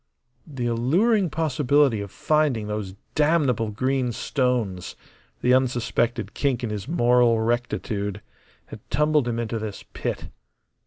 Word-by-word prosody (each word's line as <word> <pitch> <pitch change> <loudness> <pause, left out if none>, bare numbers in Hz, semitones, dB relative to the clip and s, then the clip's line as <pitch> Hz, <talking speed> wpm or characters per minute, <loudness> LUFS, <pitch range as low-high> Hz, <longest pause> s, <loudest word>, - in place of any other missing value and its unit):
The 135 -5 -4
alluring 170 - +2
possibility 145 -6 +2
of 100 - -6
finding 150 -4 +1
those 105 -3 -4 0.2
damnable 145 -8 +2
green 130 +3 0
stones 120 -8 -1 0.5
the 125 - +3
unsuspected 120 -3 0
kink 130 -4 0
in 115 - -2
his 105 +2 -5
moral 120 -6 +3
rectitude 110 -3 -2 0.4
had - - -10
tumbled 150 0 +2
him 115 -1 -1
into 115 -1 -2
this 105 -2 -6
pit. - - -4
120 Hz, 120 wpm, -24 LUFS, 110-140 Hz, 0.5 s, the